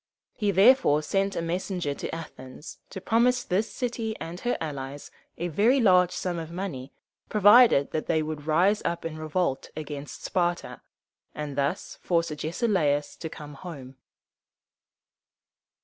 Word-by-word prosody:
He 210 -3 -1
therefore 195 - +5
sent 195 +4 0
a - - -2
messenger 175 -2 -2
to 140 - -5
Athens 150 -2 -10
to - - -7
promise 245 +5 +2
this 205 +3 -1
city 230 -3 -3
and 170 +2 -6
her 245 +3 -1
allies 140 -2 -6 0.3
a 175 - -2
very 220 - +3
large 180 -6 +5
sum 180 -1 -3
of 160 -1 -6
money 170 -7 -5 0.4
provided 210 - +6
that 155 - -3
they 160 -1 +1
would 155 -1 -6
rise 185 +7 +3
up 170 -1 -2
in 165 -1 -4
revolt 155 -2 -1
against 145 -2 -7
Sparta, 175 -1 -1 0.5
and 150 -2 -5
thus 140 +6 -2
force 170 -2 0
Agesilaus 155 -2 0
to 160 - -6
come 150 -1 -10
home. 135 -4 -9
170 Hz, 140 wpm, -26 LUFS, 150-195 Hz, 0.5 s, provided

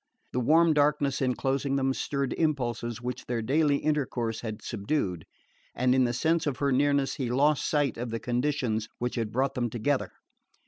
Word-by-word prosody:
The 125 - -1
warm 160 +6 +4
darkness 145 -2 +2
enclosing 135 +2 0
them 135 -1 +1
stirred 140 0 -2
impulses 120 -7 -1
which 125 0 -5
their 120 -2 -1
daily 145 +4 +2
intercourse 130 -7 -1
had 110 -2 -6
subdued, 100 - -2 0.5
and 125 +1 +2
in 130 -1 +4
the 120 - 0
sense 160 +5 +1
of 135 -4 -1
her 140 -1 +1
nearness 140 +1 +2
he 130 -4 -2
lost 145 +4 +2
sight 145 -6 +1
of 120 0 -3
the 115 0 -3
conditions 120 -3 -1
which 125 0 -2
had 115 -3 -2
brought 130 +3 0
them 120 -1 -1
together. 125 +5 -1
130 Hz, 175 wpm, -28 LUFS, 120-145 Hz, 0.5 s, warm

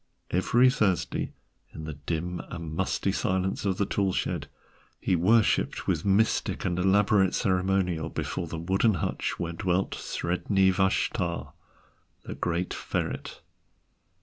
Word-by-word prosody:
Every 120 +8 +4
Thursday, 100 - 0 0.4
in 80 - -7
the 75 0 -5
dim 80 +4 -3
and 85 -3 -6
musty - - 0
silence 95 +2 -1
of 95 -2 +1
the 100 - +1
tool 95 -1 0
shed, - - -2 0.5
he 95 - +1
worshipped 105 +6 +2
with - - 0
mystic 100 +2 +1
and 90 -1 0
elaborate 95 0 +3
ceremonial 90 -4 +1
before - - -3
the - - -5
wooden 95 +6 +2
hutch 80 - -2
where 85 0 -3
dwelt 95 +1 0
Sredni 95 +2 +1
Vashtar, 90 -2 0 0.7
the - - -6
great 90 +1 -2
ferret. - - -4
95 Hz, 125 wpm, -27 LUFS, 85-95 Hz, 0.7 s, Every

